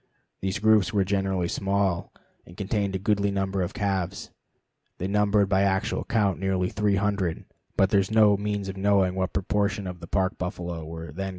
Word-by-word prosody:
These 95 0 -1
groups 110 -2 +4
were 100 -2 +2
generally 95 -2 0
small, 95 -2 -1 0.3
and 85 - -15
each - - -18
contained 100 -1 -1
a - - +2
goodly 100 +1 +1
number 95 -1 -1
of 90 - -3
calves. 95 -3 -2 0.7
They 90 - -4
numbered 105 0 +2
by 95 0 +2
actual 95 +1 0
count 105 -5 +1
nearly 95 -1 0
300, 100 -4 0 0.3
but 95 0 +3
there 100 - +5
is 95 - -1
no 110 -2 +5
means 100 -1 -2
of 95 0 -6
knowing 95 -2 +3
what 95 0 -1
proportion 100 +1 -1
of 90 -1 -6
the 85 - -9
Park 95 +1 0
buffalo 90 -2 -4
were 80 -1 -7
then - - -13
gathered 85 - -11
here. - - -3
95 Hz, 195 wpm, -26 LUFS, 95-100 Hz, 0.7 s, there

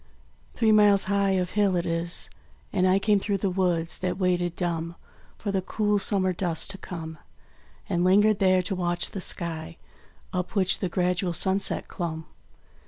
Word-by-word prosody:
Three 225 -2 +3
miles 205 -2 +5
of 195 -2 +1
hill 205 -3 +2
it 175 - -1
is; 170 +1 -1 0.4
and 185 -2 +2
I 185 +1 +4
Came 205 +1 +2
through 200 0 -1
the 195 0 -1
woods 175 -3 0
that 185 0 -2
waited, 175 -2 0
dumb, 170 -1 -3 0.4
For 205 - -3
the 190 -1 0
cool 210 +2 0
Summer 190 -2 +1
dusk 175 -1 -2
to 195 - -10
come; 160 -3 -7 0.7
And 175 0 0
lingered 205 +3 +4
there 185 -1 +3
to 190 - -3
watch 175 -1 -1
the 195 - -5
sky 165 -2 -3 0.6
Up 180 +3 -3
which 190 -2 +2
the 185 - -2
gradual 180 0 0
sunset 190 +3 +2
clomb. 160 -3 -5
185 Hz, 165 wpm, -26 LUFS, 175-195 Hz, 0.7 s, miles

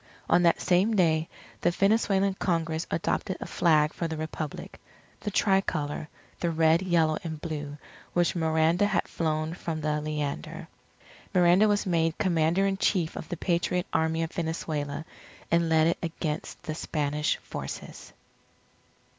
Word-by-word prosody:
On 175 - +4
that 170 -1 +4
same 190 +5 +2
day, 160 -4 +2 0.3
the - - +3
Venezuelan 195 +1 +2
Congress 165 -4 -1
adopted 180 +3 -1
a - - -5
flag 155 -3 +3
for 170 - -2
the 160 -1 -4
Republic 155 -1 -6 0.4
the 210 - -3
tri 195 -1 +3
colour, 150 -4 -3 0.3
the 170 - 0
Red, 160 +1 +3
Yellow, 165 -4 +2
and 160 -2 -5
Blue, 150 -2 -5 0.4
which 175 0 +2
Miranda 160 +3 +2
had 195 -3 0
flown 155 -1 -1
from 165 -2 -4
the 150 0 0
Leander. 150 - -4 0.7
Miranda 180 +4 +5
was 205 0 +1
made 165 -3 +1
Commander 175 0 +2
in 195 -1 0
Chief 180 -5 +1
of 160 - -7
the 175 - -3
Patriot 180 0 0
Army 160 +1 +1
of 165 - -4
Venezuela, 160 -3 -3 0.5
and 170 0 +3
led 160 -1 +4
it 165 - +1
against 165 -2 -4
the 160 -3 -3
Spanish 150 -1 -1
forces. - - -8
165 Hz, 145 wpm, -27 LUFS, 155-180 Hz, 0.7 s, Miranda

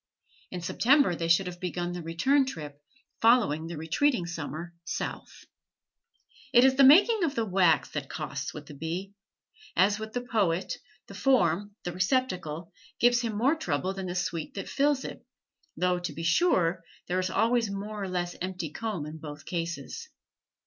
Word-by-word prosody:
In 180 - -5
September 250 - +3
they 165 0 -2
should 165 +3 +4
have 180 -1 -6
begun 175 -1 -3
the 175 0 -5
return 260 - +2
trip, 150 - -7 0.4
following 215 -10 +4
the 170 -1 -6
retreating 175 - +1
summer 170 0 -6
South. - - -5 1.1
It 245 0 +7
is 265 - +5
the 275 +1 +5
making 385 - +7
of 295 -4 0
the 230 - 0
wax 180 -6 +3
that 145 -3 -4
costs 145 -2 -4
with 150 -1 -9
the 150 - -11
bee. 170 +7 -5 0.6
As 205 +3 +3
with 220 0 -7
the 245 - -1
poet, 195 -7 0 0.3
the - - -12
form, 205 -7 +2
the 175 - -3
receptacle, 185 - -1 0.3
gives 240 0 +4
him 225 -3 -3
more 260 +7 +3
trouble 180 - -2
than 190 -1 -5
the 175 - -4
sweet 170 -3 -3
that 195 - -5
fills 285 -1 +1
it, - - -8 0.5
though, 180 0 +1
to 175 -3 -4
be 165 - -6
sure, 175 - +2 0.2
there 180 +1 0
is 185 0 -1
always 230 +3 +2
more 205 +1 -5
or 195 - -3
less 175 -1 -2
empty 180 -4 -4
comb 210 -6 -4
in 155 +1 -8
both 150 -1 -9
cases. 170 - -4
185 Hz, 170 wpm, -28 LUFS, 165-230 Hz, 1.1 s, It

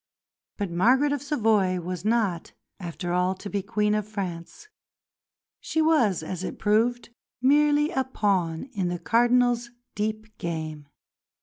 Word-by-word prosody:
But 200 -4 -3
Margaret 250 +11 +3
of 285 - -2
Savoy 215 -10 +1
was 180 0 -5
not 215 -6 0 0.3
after 175 0 -4
all 180 +1 +1
to 200 +2 -8
be 200 - -1
Queen 210 +2 0
of 210 -1 -1
France. 190 - -6 0.9
She 320 - -2
was, 285 - +3
as 185 +2 -5
it - - -5
proved, 230 +4 +1 0.3
merely 295 +3 +3
a 265 - 0
pawn 190 -10 0
in 190 -5 -1
the 175 0 -2
Cardinal's 240 +3 +2 0.2
deep 215 0 -4
game. 155 -3 -5
210 Hz, 135 wpm, -26 LUFS, 180-245 Hz, 0.9 s, Margaret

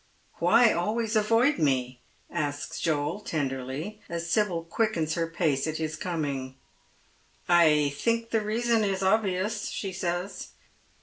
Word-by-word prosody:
" - - -37
Why 235 -2 +5
always 220 +5 -1
avoid 230 +7 +3
me? 130 -4 0
" - - -36
asks 145 -1 -3
Joel 155 +3 0
tenderly, 145 +4 -4
as 170 0 -4
Sibyl 175 -2 +1
quickens 165 -3 0
her 165 0 -1
pace 160 -4 0
at 155 0 -2
his 155 -1 -3
coming. 145 -6 -3 0.5
" - - -36 0.2
I 150 -4 +4
think 230 +8 -1
the 225 - +2
reason 225 +1 +1
is 195 -1 -1
obvious," 205 +1 +1
she 195 -2 -4
says. 180 +1 -4
175 Hz, 140 wpm, -27 LUFS, 150-215 Hz, 0.5 s, Why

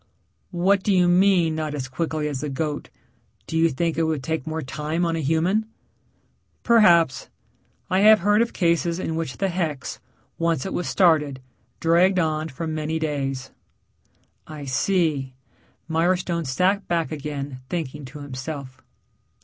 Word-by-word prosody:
"What 190 +2 +2
do 205 - 0
you 180 -2 +4
mean 175 -2 +4
not 155 -1 -3
as 130 -3 -4
quickly 155 +3 -2
as 145 -3 -3
the 150 - -3
goat 145 +1 -3 0.6
do - - -6
you 165 +1 +4
think 165 +3 -1
it - - +3
would 155 -4 -1
take 160 -1 -3
more 160 0 -3
time 155 +6 -2
on 165 -1 0
a - - -2
human?" 165 +9 +1 1.0
"Perhaps. 170 - +4 0.6
I 185 - +1
have 215 0 +7
heard 205 +3 +3
of 235 - 0
cases 170 -1 +1
in 165 -3 -3
which 160 -7 -4
the 195 - 0
hex, 165 -6 -3 0.4
once 165 -4 0
it 190 - -4
was 175 - -2
started, 155 -7 +3 0.4
dragged 175 +3 +3
on 155 -2 0
for 145 +4 -5
many 155 0 -2
days." 135 -4 -3 1.0
"I 150 -2 -8
see." 140 -2 0 0.5
Mirestone 170 0 0
sat 185 +10 +1
back 170 -2 0
again 145 -3 -5
thinking 150 -4 -4
to 145 +3 -10
himself. 135 -1 -7
160 Hz, 150 wpm, -23 LUFS, 145-175 Hz, 1.0 s, have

